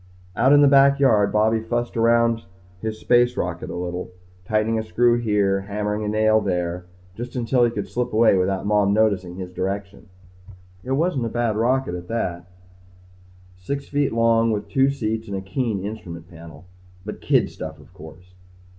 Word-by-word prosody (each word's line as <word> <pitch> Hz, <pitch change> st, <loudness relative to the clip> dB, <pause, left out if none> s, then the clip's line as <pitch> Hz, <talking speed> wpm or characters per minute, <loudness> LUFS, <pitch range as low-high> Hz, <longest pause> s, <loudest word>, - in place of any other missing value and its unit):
Out 130 Hz, +4 st, +3 dB
in 145 Hz, 0 st, +7 dB
the -, -, +7 dB
backyard, 135 Hz, -6 st, +4 dB
Bobby 110 Hz, +1 st, +2 dB
fussed 120 Hz, +2 st, -3 dB
around 115 Hz, 0 st, +2 dB, 0.4 s
his 110 Hz, -1 st, -4 dB
space 120 Hz, 0 st, +2 dB
rocket 90 Hz, -1 st, -3 dB
a -, -, -6 dB
little: 90 Hz, +1 st, -4 dB, 0.4 s
tightening 110 Hz, +2 st, 0 dB
a -, -, -3 dB
screw 120 Hz, +2 st, +2 dB
here 100 Hz, -4 st, +1 dB
hammering 105 Hz, +1 st, -2 dB
in 105 Hz, -, -2 dB
a -, -, -2 dB
nail 110 Hz, 0 st, +4 dB
there. 90 Hz, -2 st, -2 dB, 0.3 s
Just 120 Hz, +6 st, -8 dB
until 125 Hz, 0 st, +1 dB
he -, -, +2 dB
could 105 Hz, -4 st, -5 dB
slip 125 Hz, 0 st, -3 dB
away 110 Hz, -1 st, +4 dB
without 95 Hz, +1 st, 0 dB
Mom 105 Hz, -1 st, +2 dB
noticing 100 Hz, -5 st, +1 dB
his 90 Hz, -1 st, -7 dB
direction. 100 Hz, +1 st, -5 dB, 0.7 s
It 130 Hz, -, -2 dB
wasn't 140 Hz, -5 st, 0 dB
a -, -, -4 dB
bad 120 Hz, -2 st, -1 dB
rocket 125 Hz, 0 st, 0 dB
at 90 Hz, 0 st, -7 dB
that, 115 Hz, -5 st, -1 dB
he 85 Hz, -, -12 dB
thought. -, -, -28 dB, 1.1 s
Six 140 Hz, +7 st, -4 dB
feet 145 Hz, -1 st, 0 dB
long 115 Hz, 0 st, +3 dB
with 105 Hz, -2 st, -2 dB
two 135 Hz, -1 st, +3 dB
seats 110 Hz, -4 st, -3 dB
and 100 Hz, -1 st, -4 dB
a -, -, -4 dB
keen 100 Hz, +1 st, -2 dB
instrument 85 Hz, -6 st, -7 dB
panel. 85 Hz, 0 st, -13 dB, 0.4 s
But 105 Hz, -, -7 dB
kid -, -, +2 dB
stuff 80 Hz, -1 st, -8 dB
of 75 Hz, +4 st, -18 dB
course. 90 Hz, +1 st, -14 dB
110 Hz, 180 wpm, -22 LUFS, 95-120 Hz, 1.1 s, in